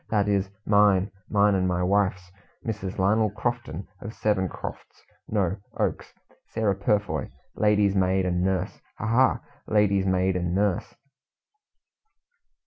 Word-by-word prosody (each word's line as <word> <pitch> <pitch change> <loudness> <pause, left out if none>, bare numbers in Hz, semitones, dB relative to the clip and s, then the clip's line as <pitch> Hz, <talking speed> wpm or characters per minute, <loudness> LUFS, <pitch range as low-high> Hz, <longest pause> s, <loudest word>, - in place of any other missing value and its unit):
That 105 -2 +1
is, 100 -1 +1 0.2
mine. 100 -2 +4 0.2
Mine 105 0 +4
and 95 -1 +1
my 90 0 0
wife's, 95 -1 0 0.3
Mrs. 105 -5 -4
Lionel 105 +3 +3
Crofton, 105 -4 -4
of 110 +2 -7
Seven 95 -4 0
Crofts, - - -9 0.2
no 100 -3 0 0.2
oaks - - -2 0.4
Sarah 110 -3 0
Purfoy, 100 -6 -1 0.3
lady's 105 -2 +3
maid 95 0 +2
and 90 -1 0
nurse 95 0 -1 0.2
ha! - - -4
ha! 120 +4 +3 0.3
lady's 100 -2 +2
maid 95 0 +2
and 90 0 -1
nurse!" 100 -2 0
100 Hz, 130 wpm, -26 LUFS, 95-105 Hz, 0.4 s, mine